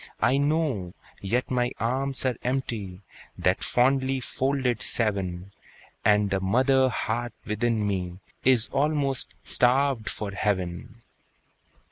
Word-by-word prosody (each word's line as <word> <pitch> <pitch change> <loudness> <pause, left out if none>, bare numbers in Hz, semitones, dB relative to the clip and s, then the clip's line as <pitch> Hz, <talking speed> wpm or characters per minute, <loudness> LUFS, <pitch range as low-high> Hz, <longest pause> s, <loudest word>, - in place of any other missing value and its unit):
I 125 +5 +4
know, 145 - 0 0.3
yet 120 +7 -1
my 125 -1 +1
arms 135 +4 -1
are 130 -2 +1
empty, 115 -8 -3 0.4
That - - +1
fondly 130 +1 +2
folded 130 -2 -1
seven, 95 -4 0 0.5
And 105 -1 +3
the 95 - +1
mother 130 +7 +3
heart 120 0 -2
within 110 0 0
me 90 -3 -2 0.3
Is 125 -3 +3
almost 140 -2 0 0.2
starved 125 -3 +2
for 105 -2 -5
heaven. 100 +2 -3
120 Hz, 110 wpm, -26 LUFS, 100-130 Hz, 0.5 s, I